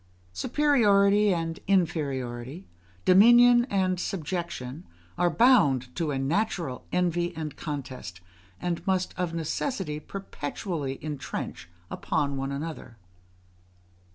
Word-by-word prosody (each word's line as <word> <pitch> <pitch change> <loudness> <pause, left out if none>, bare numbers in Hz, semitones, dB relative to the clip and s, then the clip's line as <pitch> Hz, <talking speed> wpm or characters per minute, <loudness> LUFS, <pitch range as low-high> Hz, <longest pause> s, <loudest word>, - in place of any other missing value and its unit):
Superiority 205 - +3
and 165 -2 -2
inferiority, 140 -6 -1 0.4
dominion 240 +5 +7
and 185 -6 0
subjection 170 -6 -4 0.3
are 175 0 +2
bound 145 - +3
to 165 -3 -1
a 140 - -1
natural 160 - -2
envy 175 -1 0
and 155 -2 -5
contest, 130 - -6 0.4
and 175 -1 -3
must 185 -1 0
of 180 -2 -2
necessity 165 - -2
perpetually 150 -4 -5
intrench 145 - -5 0.2
upon 140 -1 -1
one 135 0 -3
another. 140 -5 -6
170 Hz, 100 wpm, -27 LUFS, 140-195 Hz, 0.4 s, dominion